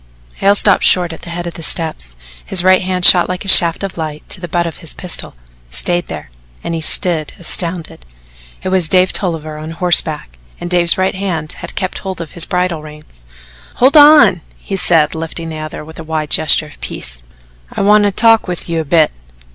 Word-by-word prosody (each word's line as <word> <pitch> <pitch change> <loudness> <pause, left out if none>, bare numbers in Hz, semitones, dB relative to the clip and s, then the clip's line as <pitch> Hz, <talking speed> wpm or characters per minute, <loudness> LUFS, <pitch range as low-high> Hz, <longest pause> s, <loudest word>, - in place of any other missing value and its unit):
Hale 200 +1 +2
stopped 200 -1 +2
short 175 -2 +3
at 160 - -12
the 170 - -10
head 175 +1 -5
of 170 - -6
the - - -10
steps, 155 - -1 0.3
his 185 -2 +4
right 185 0 +4
hand 185 -1 -2
shot 180 -1 +5
like 180 +2 -5
a - - -8
shaft 170 -2 +6
of 195 -3 -6
light 155 -1 -6
to 185 - -1
the 175 - -6
butt 170 +1 -1
of 165 - -6
his 165 -4 -5
pistol, 180 - -3 0.3
stayed 175 - -2
there - - -9 0.3
and 170 - -4
he 165 - -4
stood 160 -1 +2
astounded. 170 - -4 0.6
It - - -3
was 185 -4 +1
Dave 185 +1 +3
Tolliver 155 -4 -4
on 155 +1 -8
horseback, 160 - -1 0.2
and 175 - -7
Dave's 175 -1 +4
right 190 0 0
hand 175 -5 -4
had - - -9
kept 185 -1 -4
hold 190 -2 -7
of 165 -2 -8
his 170 -2 +4
bridle 180 -3 -2
reins. 150 - -14 0.5
"Hold 260 +5 +2
on!" 290 - +6 0.2
he 195 - -6
said, 165 -5 +2
lifting 165 +1 -6
the 155 -1 -7
other 155 0 -8
with 160 +1 -13
a - - -7
wide 155 -1 -4
gesture 155 0 +3
of 150 - -17
peace. - - -4 0.5
"I - - -4
want 210 +1 +4
to 205 - +1
talk 225 +2 +2
with 180 -1 -6
you 165 -1 -2
a - - -2
bit." 155 +1 +2
170 Hz, 210 wpm, -14 LUFS, 155-185 Hz, 0.6 s, shaft